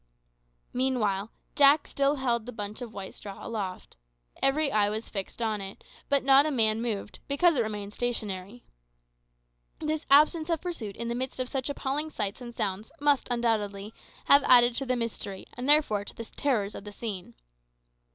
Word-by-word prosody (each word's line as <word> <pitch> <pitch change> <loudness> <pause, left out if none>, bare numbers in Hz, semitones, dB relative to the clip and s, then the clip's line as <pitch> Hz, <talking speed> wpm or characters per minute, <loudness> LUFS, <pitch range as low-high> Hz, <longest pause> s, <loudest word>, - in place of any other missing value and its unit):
Meanwhile 225 -6 0 0.3
Jack 285 +1 +6
still 280 +1 +1
held 240 -4 -1
the - - -4
bunch 210 0 -6
of 240 -3 -6
white 195 -3 -7
straw 200 -2 -9
aloft. 195 - -5 0.4
Every 280 +1 +2
eye 205 -3 +3
was 220 +2 -4
fixed 200 +3 -5
on 215 -2 -1
it, 195 0 -9 0.3
but 280 -2 +3
not 275 +2 +6
a - - +1
man 225 -5 +2
moved, 215 -4 -4
because 335 +4 +3
it 250 - +2
remained 210 -2 -4
stationary. 215 -2 -4 1.2
This 310 0 -3
absence 310 +3 +5
of 330 -2 +1
pursuit 250 - -5
in 235 - -4
the 235 - -1
midst 260 +2 -4
of 255 -1 -2
such 265 0 -2
appalling 285 +2 -2
sights 210 -4 -3
and 240 -1 -8
sounds 210 -1 -2
must, 290 -1 +2
undoubtedly, 215 -4 -1 0.3
have 280 +1 +7
added 245 -1 +7
to 270 - -3
the 255 - +2
mystery 225 -5 -4
and 250 +3 -4
therefore 290 -9 +4
to - - -8
the 230 - -7
terrors 220 -6 -1
of - - -8
the 205 - -8
scene. 200 - -6
235 Hz, 175 wpm, -28 LUFS, 205-275 Hz, 1.2 s, have